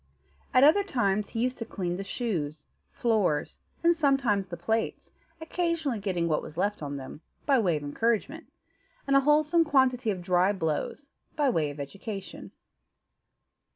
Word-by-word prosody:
At 255 - +5
other 320 +8 +6
times 210 - 0
he 225 - -3
used 255 +1 -1
to - - -2
clean 180 -5 -3
the 195 - -4
shoes, 170 - -3 0.3
floors, 210 -10 0 0.2
and 340 0 +5
sometimes 270 - +2
the 175 -1 -7
plates, 220 +6 -2 0.3
occasionally 325 -6 -1
getting 185 -4 -1
what 155 -2 +1
was 155 - -10
left 205 +1 0
on 145 -1 -4
them, 135 +3 -9 0.2
by 275 -3 +4
way 175 -8 +2
of 145 - -7
encouragement, 230 - -1 0.5
and 275 - +2
a - - +8
wholesome 300 +4 +4
quantity 260 -5 +2
of 185 -4 -2
dry 180 +2 +3
blows, 175 - -3 0.3
by 290 -4 +2
way 155 -8 0
of 145 0 -9
education. 195 +7 -7
215 Hz, 155 wpm, -28 LUFS, 175-275 Hz, 0.5 s, a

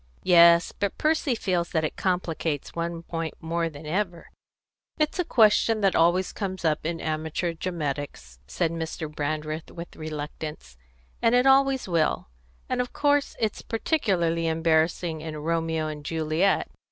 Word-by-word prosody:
"Yes, 170 -1 +6
but 200 - -3
Percy 305 -4 +1
feels 180 -5 -1
that 160 -2 0
it 155 - -2
complicates 165 -5 -2
one 170 0 -3
point 165 -1 -4
more 165 0 -1
than 150 0 -11
ever 175 +1 -3 0.3
" - - -67 0.3
"It's 305 +3 0
a - - +3
question 220 -5 +4
that 195 -2 +3
always 175 +3 +3
comes 190 -4 -4
up 155 0 +1
in 165 0 -3
amateur 160 +2 -2
dramatics," 145 - -5
said 165 - -1
Mr. 165 0 -4
Brandreth, 155 +1 -4
with 170 0 -9
reluctance, 150 - -6 0.5
"and 230 +1 +4
it 250 +1 +4
always 270 -2 +4
will; 165 - 0 0.4
and 255 -1 0
of 250 - -5
course 290 -1 +1
it's 220 -2 -1
particularly 185 - 0
embarrassing 160 0 +1
in 155 -1 -6
Romeo 160 0 -1
and 150 -1 -5
Juliet. 160 +4 +1
165 Hz, 150 wpm, -26 LUFS, 155-190 Hz, 0.5 s, Yes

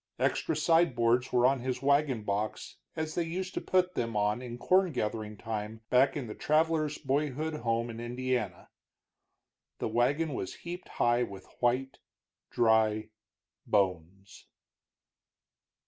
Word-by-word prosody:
Extra - - 0
side 165 -4 +3
boards 120 +2 +2
were 125 -1 +4
on 135 +1 +3
his 125 +1 -3
wagon 140 -5 +2
box, 105 +1 -3 0.2
as 155 0 -3
they 175 - 0
used 185 +3 -4
to - - -3
put 185 -1 +1
them 115 -7 -2
on 105 +3 +1
in 120 -1 -7
corn 185 +7 +3
gathering 105 -4 -3
time 110 0 -5
back 135 +3 +4
in 135 - -3
the 110 - -6
traveler's 155 +1 +1
boyhood 150 +2 -1
home 115 -2 0
in 115 -1 -7
Indiana. 120 -5 -3 1.1
The - - -2
wagon 140 +7 +1
was 95 - -4
heaped 175 +1 -6
high 120 0 +2
with 100 -5 -5 0.2
white, 125 +2 +1 0.5
dry 110 -2 +2 0.6
bones. 95 -1 -1
125 Hz, 135 wpm, -30 LUFS, 110-150 Hz, 1.1 s, were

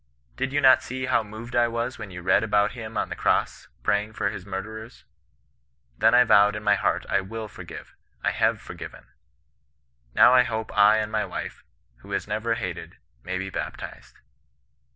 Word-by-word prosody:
Did 135 - -2
you 145 +1 +1
not 130 -1 +7
see 130 +1 -4
how 130 -2 +2
moved 110 +3 -9
I 120 -1 +4
was 115 +2 -3
when 105 - -7
you 90 -1 -9
read 95 +3 +3
about 105 -1 +2
him 115 -2 -7
on - - -1
the - - -4
cross - - 0 0.2
praying 105 - 0
for 100 -1 -1
his 95 -2 -9
murderers? 110 +4 -7 0.9
Then 115 - +4
I 125 - +7
vowed 105 -3 +5
in 105 - -6
my 105 -1 +4
heart 100 - 0
I - - +2
wiU 110 +3 -6
forgive; - - -10 0.3
I - - +2
have - - +1
forgiven. - - -10 1.1
Now 125 - +7
I 125 - +7
hope 110 -2 -3
I 105 +1 +6
and 110 0 -2
my 110 -1 0
wife, - - -7 0.3
who 60 - -16
has - - -2
never 115 +1 -1
hated, 95 -6 -6 0.3
may 95 0 -3
be 95 +1 -5
baptized.' - - -7
110 Hz, 185 wpm, -25 LUFS, 100-115 Hz, 1.1 s, not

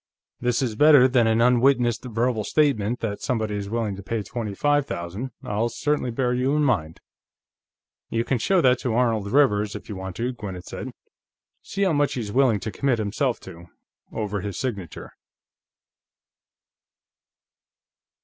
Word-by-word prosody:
"This 125 +1 0
is 120 -4 -1
better 145 0 +7
than 125 -3 +3
an 110 +1 +2
unwitnessed 125 0 +3
verbal 115 -1 0
statement 125 -5 +1
that 105 -3 -3
somebody 110 -4 -1
is 100 -1 -4
willing 110 -3 -2
to - - -7
pay 110 +2 -3
twenty 105 0 -5
five 145 +3 +2
thousand. 90 +9 -5
I'll 105 +3 -1
certainly 145 +1 -1
bear 125 +1 0
you 130 +3 +1
in 150 - +2
mind." 85 - 0 1.1
"You 115 0 0
can 125 0 -1
show 185 - +2
that 130 -3 +4
to 120 -3 -2
Arnold 115 -5 +1
Rivers, 105 -7 +3
if - - -9
you 105 - -5
want 95 -1 -6
to," 125 +2 -2
Gwinnett 95 -6 -7
said. - - -6 0.7
"See 200 - -3
how 185 -4 +2
much 145 -1 +1
he's 110 -5 -4
willing 125 -3 +3
to 110 - -4
commit 130 +3 0
himself 115 +4 -1
to, 85 -2 -11 0.4
over 105 -2 -3
his 100 -1 -5
signature." 100 - -5
115 Hz, 160 wpm, -24 LUFS, 105-130 Hz, 1.1 s, better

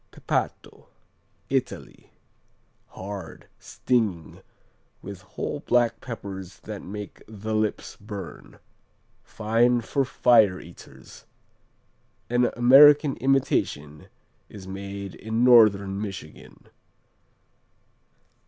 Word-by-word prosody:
Pepato - - -4 0.6
Italy - - -4 0.8
Hard; 95 -3 -9
stinging, 105 -10 -2 0.6
with 100 -1 -9
whole 95 - -5
black 120 -2 +1
peppers 95 -6 -8
that 105 -2 -8
make 105 +1 -9
the 110 0 -6
lips 110 -1 -2
burn. 100 -3 -9 0.7
Fine 115 +3 +1
for 140 +4 -1
fire 110 -7 +3
eaters. 85 - -15 1.1
An 120 0 +3
American 145 +4 +7
imitation 75 - -1 0.4
is 95 -3 -11
made 100 0 -7
in 110 +2 -2
Northern 100 -5 +5
Michigan. 95 -7 -9
105 Hz, 80 wpm, -25 LUFS, 95-120 Hz, 1.1 s, American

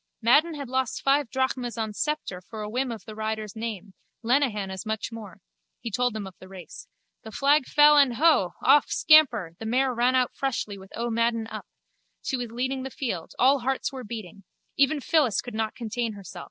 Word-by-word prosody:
Madden 300 +8 +4
had 280 -2 -6
lost 260 0 -2
five 275 -2 +2
drachmas 255 -3 -2
on 220 -2 -3
Sceptre 300 -9 -3
for 215 +3 -8
a - - -4
whim 255 +1 -1
of 225 - -8
the 215 - -8
rider's 215 -1 -4
name: 220 -4 -6 0.3
Lenehan 225 -6 +1
as 190 -1 -6
much 220 +1 -3
more. 205 -4 -10 0.4
He 230 - -6
told 245 +2 0
them 210 -2 -4
of 190 - -9
the 185 - -12
race. 185 -4 -11 0.3
The 220 - -10
flag 280 +3 +2
fell 295 0 +6
and, 275 -4 +4
huuh! 275 - +3
off, 280 +2 +5
scamper, 245 - +4
the 225 - -5
mare 255 +3 +1
ran 245 +2 +2
out 255 -1 +1
freshly 240 -6 -2
with 190 -1 -14
O. 235 +1 -2
Madden 230 0 0
up. - - -7 0.6
She 270 - -1
was 245 -3 -4
leading 260 +3 -2
the 265 - -5
field. 210 - -5
All 270 +2 +4
hearts 265 +2 -2
were 260 -1 -6
beating. 205 -4 -8 0.3
Even 280 +2 +2
Phyllis 270 - +2
could 245 - -6
not 220 0 -2
contain 230 -1 -3
herself. 195 -3 -10
235 Hz, 200 wpm, -26 LUFS, 215-265 Hz, 0.6 s, fell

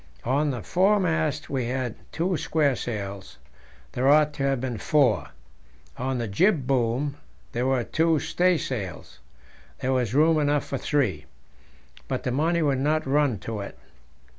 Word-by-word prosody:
On 140 +5 +1
the 125 -6 -4
foremast 170 - +1
we 130 -3 -2
had 125 -1 -2 0.2
two 170 +3 -1
squaresails; 120 - -2 0.5
there 130 +2 0
ought 150 0 +5
to 140 - -6
have 135 -2 +1
been 120 -3 -4
four. 120 - +2 0.7
On 130 +1 -2
the 120 -2 -2
jib 155 - +2
boom 130 +2 0 0.3
there 120 +2 -1
were 130 -2 +1
two 160 +5 +2
staysails; 135 - -1 0.6
there 130 +1 0
was 125 -2 0
room 155 +2 +4
enough 145 -1 +1
for 135 - -4
three, 110 - 0 0.8
but - - -3
the 125 - -1
money 160 +5 +1
would 140 -3 +1
not 155 +3 +1
run 140 -3 +2
to 110 -2 -5
it. 100 - -7
135 Hz, 145 wpm, -25 LUFS, 120-155 Hz, 0.8 s, ought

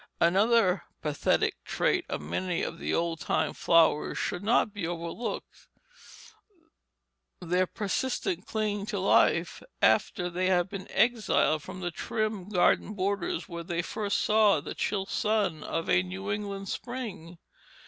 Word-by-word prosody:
Another 195 +1 +3 0.2
pathetic 150 -1 0
trait - - 0
of - - -3
many 170 - -2
of 165 - -4
the - - -2
old 165 -1 0
time 145 +2 0
flowers 165 -3 +3
should 180 - -2
not 215 -1 +2
be 200 -6 -3
overlooked 170 +7 -5 1.7
their 180 +1 +1
persistent 260 - -2
clinging 210 -2 -2
to - - -2
life - - +3 0.2
after 175 - +2
they 180 +1 -1
had 180 0 +2
been 195 -1 -7
exiled 215 -8 +2
from 185 +4 -9
the 175 -1 -2
trim 215 +1 -3
garden 210 +2 +2
borders 195 -3 -1
where 170 -1 -6
they 170 +1 -2
first 205 +2 -2
saw 210 -5 +4
the - - -6
chill 195 -2 -1
sun 200 -6 0
of 165 - -3
a 90 - +4
New 95 +1 -5
England 200 -1 -4
spring. 200 -9 -6
185 Hz, 140 wpm, -28 LUFS, 170-210 Hz, 1.7 s, saw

